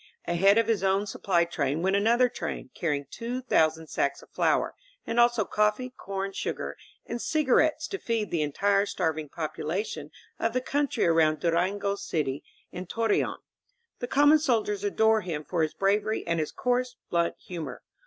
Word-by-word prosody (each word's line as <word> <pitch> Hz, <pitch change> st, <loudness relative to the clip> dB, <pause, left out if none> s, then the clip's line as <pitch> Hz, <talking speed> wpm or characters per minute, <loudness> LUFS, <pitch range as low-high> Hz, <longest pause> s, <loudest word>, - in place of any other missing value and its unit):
Ahead 195 Hz, +4 st, +4 dB
of 230 Hz, -, +4 dB
his 220 Hz, -4 st, +1 dB
own 195 Hz, +1 st, +2 dB
sup 200 Hz, -, -8 dB
ply 175 Hz, -3 st, +3 dB
train 155 Hz, -2 st, -1 dB
went 190 Hz, +1 st, +2 dB
another 235 Hz, +5 st, +4 dB
train, 245 Hz, 0 st, -6 dB
carrying 145 Hz, -5 st, -1 dB
two 240 Hz, +2 st, -4 dB
thousand 160 Hz, -10 st, +2 dB
sacks 140 Hz, -2 st, -1 dB
of -, -, -19 dB
flour, -, -, +1 dB, 0.3 s
and 230 Hz, -, -1 dB
also 240 Hz, -3 st, +4 dB
coffee, 210 Hz, +6 st, 0 dB
corn, 195 Hz, 0 st, -4 dB
sugar, -, -, -4 dB, 0.3 s
and 235 Hz, 0 st, -4 dB
cigar 305 Hz, -5 st, +2 dB
ettes 310 Hz, +1 st, +1 dB
to 390 Hz, -, -5 dB
feed 225 Hz, -3 st, -2 dB
the 170 Hz, -, 0 dB
entire 200 Hz, +7 st, +1 dB
starving 155 Hz, -4 st, -2 dB
population 160 Hz, +1 st, -4 dB, 0.3 s
of 230 Hz, 0 st, 0 dB
the 255 Hz, -, +2 dB
country 285 Hz, +2 st, 0 dB
around 160 Hz, -2 st, +3 dB
Durango 185 Hz, +5 st, +1 dB
City 155 Hz, -8 st, -2 dB, 0.3 s
and 180 Hz, 0 st, -7 dB
Torreon. 225 Hz, -2 st, 0 dB, 0.6 s
The 245 Hz, -, -3 dB
common 290 Hz, +4 st, +5 dB
soldiers 215 Hz, -8 st, 0 dB
adore 220 Hz, +2 st, +3 dB
him 165 Hz, -5 st, -4 dB
for 175 Hz, -3 st, -1 dB
his 155 Hz, -1 st, 0 dB
bravery 205 Hz, +2 st, +1 dB
and 170 Hz, -1 st, 0 dB
his 155 Hz, -, -2 dB
coarse, 250 Hz, 0 st, -1 dB, 0.2 s
blunt 170 Hz, -1 st, +1 dB
humor. 170 Hz, -3 st, -7 dB
200 Hz, 170 wpm, -27 LUFS, 170-230 Hz, 0.6 s, common